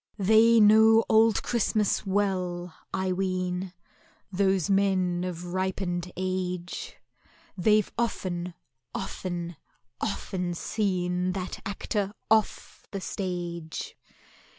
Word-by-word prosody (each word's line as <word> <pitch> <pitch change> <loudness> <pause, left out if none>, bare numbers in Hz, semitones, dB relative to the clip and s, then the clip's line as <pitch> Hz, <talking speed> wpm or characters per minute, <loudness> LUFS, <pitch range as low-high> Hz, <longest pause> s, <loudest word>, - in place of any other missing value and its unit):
They 220 +3 +5
know 220 +1 +7
Old 220 0 +4
Christmas 215 -3 +1
well, 185 -3 -1 0.2
I 190 -1 -1
ween, 185 0 -1 0.6
Those 190 -2 +2
men 190 -3 +2
of 175 -1 -5
ripened 185 -1 -2
age; 180 -1 -3 0.6
They've 210 +2 +3
often, 180 -6 -2 0.4
often, 175 -3 -4 0.4
often 180 -4 -2
seen 180 -2 -1
That 185 -1 -4
Actor 200 0 -2 0.2
off 220 -2 +1
the 195 - -4
stage! 175 -4 -4
185 Hz, 90 wpm, -27 LUFS, 180-205 Hz, 0.6 s, know